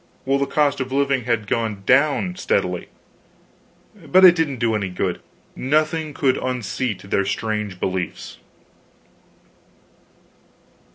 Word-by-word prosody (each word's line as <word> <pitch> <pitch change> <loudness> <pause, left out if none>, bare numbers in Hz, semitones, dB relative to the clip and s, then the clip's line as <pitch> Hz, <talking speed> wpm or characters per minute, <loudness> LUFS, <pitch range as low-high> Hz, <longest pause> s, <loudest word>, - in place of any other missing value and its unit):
while 135 +1 +1
the 140 - 0
cost 145 0 +1
of 130 0 -4
living 140 -2 +1
had 115 -3 0
gone 125 - +1
steadily 475 - -1 1.1
down. 155 -4 -15
But 185 +3 +7
it 180 - +9
didn't 160 -6 -1
do 115 -1 0
any 100 -3 -1
good. 90 - -3 0.3
Nothing 155 +3 0
could 130 -2 +2
unseat 125 -3 -3
their 100 - +2
strange 105 -1 -3
beliefs. 95 -1 -4
130 Hz, 115 wpm, -21 LUFS, 110-150 Hz, 1.1 s, it